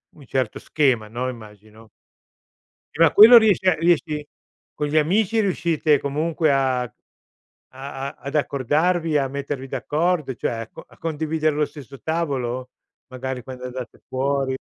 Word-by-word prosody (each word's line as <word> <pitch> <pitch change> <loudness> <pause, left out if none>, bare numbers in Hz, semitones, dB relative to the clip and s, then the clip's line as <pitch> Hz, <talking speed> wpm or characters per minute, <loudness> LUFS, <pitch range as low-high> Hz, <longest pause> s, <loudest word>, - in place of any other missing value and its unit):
un 145 - -15
certo 130 -2 -2
schema, 130 -8 +1
no, 125 +4 -3
immagino. 110 -1 -13 1.1
Eh, - - -10
ma - - +5
quello 230 +3 +10
riesce 205 -4 +4
a 185 - +4
riesci 155 -2 +1 0.5
con 150 - -2
gli 155 - 0
amici 205 +8 +2
riuscite 165 -6 +1
comunque 155 +2 0
a 130 -2 +1
a 120 -3 -6 0.8
a 135 +1 -7
ad 140 - -8
accordarvi, 155 +4 +1
a 135 - +1
mettervi 140 -1 -5
d'accordo, 150 +3 -1
cioè, - - -2
a 115 0 -5
co - - -12
a - - -21
condividere 155 -1 -1
lo 150 - +2
stesso 135 -3 -11
tavolo? 130 -6 -2 0.4
Magari 130 -1 -5
quando 125 0 -9
andate 125 -1 -7
fuori? 135 0 -1
140 Hz, 145 wpm, -22 LUFS, 130-160 Hz, 1.1 s, quello